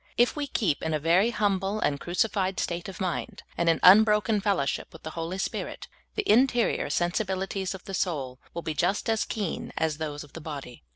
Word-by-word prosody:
If 240 +1 +4
we 295 -1 -2
keep 200 - 0
in 160 -1 -1
a - - 0
very 175 +8 +3
humble 200 -2 0
and 140 -7 0
crucified 190 +2 0
vState 170 0 -2
of 190 - -9
mind, 180 -3 -3
and 170 0 +2
in 165 - +3
unbroken 210 +1 +6
fellowship 195 -9 0
with 160 - -14
the 160 - -5
Holy 165 +3 -4
Spirit, 195 - -4 0.3
the 420 -2 -1
interior 245 0 +3
sensibili 190 +2 0
ties 190 -1 -3
of 185 - -11
the 195 - -7
soul 140 -9 -2 0.2
will 170 - -4
be 160 - -2
just 195 +7 0
as 220 - +1
keen 205 -6 -3
as 160 -1 0
those 150 -1 -4
of 145 - -17
the 165 - -8
body. 140 - -7
185 Hz, 205 wpm, -27 LUFS, 160-210 Hz, 0.3 s, unbroken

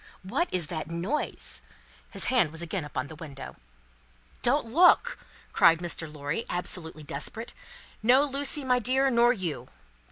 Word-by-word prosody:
What 265 - -1
is 180 -3 0
that 160 -1 -5
noise?" 180 - -3 0.5
His - - -1
hand 230 -11 +4
was 160 +2 -3
again 170 +1 -3
upon 140 -2 -4
the 155 - -10
window. 145 -3 -9 0.9
"Don't 275 +3 +2
look!" 355 - +4 0.3
cried 165 0 +6
Mr. 165 -2 -3
Lorry, 150 +7 -3
absolutely 170 -3 -3
desperate. 225 - -5 0.5
"No, 250 +5 +5
Lucie, 285 +1 0
my 250 -1 +2
dear, 265 +3 +2
nor 240 0 +5
you!" 170 - -3
185 Hz, 140 wpm, -28 LUFS, 160-255 Hz, 0.9 s, cried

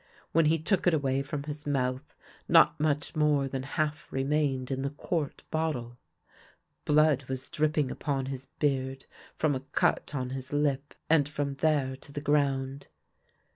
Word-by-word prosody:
When 165 0 +4
he 160 +2 +4
took 180 +4 +1
it 175 - +5
away 135 -2 +1
from 140 +1 -4
his 150 0 -6
mouth 130 0 -1 0.3
not - - +6
much 150 +2 0
more 150 -3 +3
than 135 -1 -3
half 150 +2 -2
remained 135 -1 0
in 135 0 -1
the 140 - -1
quart 150 +1 -3
bottle. 125 -7 -2 0.9
Blood 150 -2 +4
was 130 0 -4
dripping 150 -3 +1
upon 135 -3 -2
his 135 0 -6
beard 135 -2 -1 0.3
from 155 -2 +1
a 130 - -1
cut 140 +2 0
on 130 -2 -2
his 130 0 -6
lip, 145 -1 0
and 150 -3 +4
from 145 -2 -2
there 140 -2 +1
to 140 - -11
the 145 - -4
ground. 140 -2 0
140 Hz, 160 wpm, -29 LUFS, 135-150 Hz, 0.9 s, not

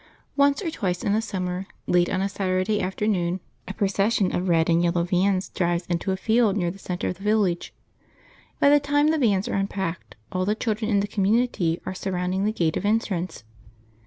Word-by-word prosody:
Once 280 +5 +3
or 330 - -2
twice 180 -10 -2
in 200 - +1
a 220 - +2
summer, 185 -3 -3 0.2
late 175 0 +2
on 190 +1 0
a - - +1
Saturday 195 +1 0
afternoon, 185 -2 -1 0.3
a 195 - -4
procession 200 0 +1
of 180 +1 -1
red 165 -1 +3
and 170 0 +3
yellow 170 0 +1
vans 185 +2 +1
drives 175 -1 -1
into 175 +2 -1
a 190 - -1
field 220 0 +2
near 175 -3 0
the 195 - -12
centre 180 -2 -3
of 180 - -4
the 195 - -13
village. 205 -5 +1 0.9
By 285 - +5
the 290 - +6
time 290 +1 +2
the 315 0 +1
vans 205 -6 +2
are - - -3
unpacked 195 -3 -3 0.2
all 185 0 -1
the 210 +3 +1
children 220 -1 -2
in 200 -3 +3
the 205 - -2
community 200 -4 +1
are - - -3
surrounding 185 0 -2
the 215 - +2
gate 165 -7 0
of - - -4
entrance. 205 - -1
195 Hz, 200 wpm, -24 LUFS, 180-215 Hz, 0.9 s, the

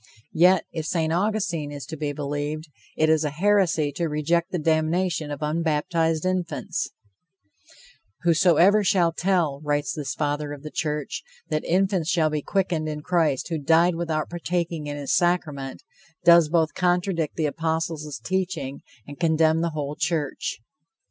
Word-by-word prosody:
Yet, 180 +3 +5
if 160 -2 -4
St. 160 -2 0
Augustine 175 -6 -1
is 145 -1 -7
to 160 - -7
be 150 -1 -2
believed, 145 +2 -4 0.3
it 155 - +3
is 160 0 +3
a 150 - 0
heresy 170 -2 +2
to 165 +4 -2
reject 165 +4 0
the 180 - -1
damnation 160 +1 0
of 145 0 -5
unbaptized 160 +1 0
infants: 185 -2 -2 1.3
"Whosoever 175 +4 +5
shall 180 -4 +3
tell," 165 -6 0
writes 145 -1 0
this 145 -3 -4
Father 145 0 -2
of 145 - -10
the 155 - -7
church, 150 -3 -3 0.3
"that 155 - -1
infants 185 -2 +1
shall 160 -3 +2
be 150 -1 -1
quickened 170 -3 -1
in 150 -1 -5
Christ 160 -4 +1
who 165 -2 -2
died 165 +4 +4
without 160 -2 -2
partaking 170 -2 -3
in 145 0 -4
his 140 -2 0
sacrament, 155 -6 -1 0.4
does 170 -2 +7
both 160 -1 +2
contradict 175 -3 0
the 160 - 0
apostles' 160 -1 -2
teaching 175 -8 -2 0.2
and 145 0 -11
condemn 160 -1 +3
the 170 - 0
whole 150 -2 -4
church." 150 -7 -2
160 Hz, 150 wpm, -24 LUFS, 150-175 Hz, 1.3 s, does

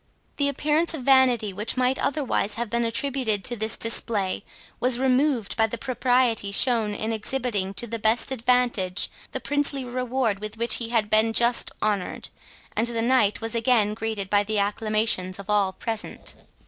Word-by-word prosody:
The 285 -1 +2
appearance 305 +4 0
of 275 - -7
vanity, 250 -6 +4
which 210 +6 -2
might 255 +1 +1
otherwise 265 -7 -1
have 235 -2 -3
been 235 0 +1
attributed 230 -3 -1
to 245 - +1
this 220 0 -1
display, 220 -4 +2 0.4
was 250 -1 +2
removed 260 -3 +1
by 225 -1 +2
the 235 - -5
propriety 245 -3 0
shown 220 -1 +2
in 220 +2 -2
exhibiting 215 -4 -2
to 240 - -2
the 230 0 -4
best 220 +5 +2
advantage 240 -6 +1 0.2
the - - -4
princely 285 -2 -1
reward 250 -3 -1
with 215 +1 -7
which 235 +1 +2
he 230 -1 -3
had 220 -3 0
been 220 +1 +3
just 235 +1 +3
honoured, 200 -4 -2 0.5
and 225 +2 0
the 230 -1 -2
Knight 235 -4 +2
was 225 0 -4
again 230 -3 +2
greeted 220 -3 -4
by 205 +1 +2
the 215 +1 -2
acclamations 205 -2 0
of 200 +1 -6
all 200 -2 +2
present. 225 +2 -6
230 Hz, 170 wpm, -24 LUFS, 210-250 Hz, 0.5 s, vanity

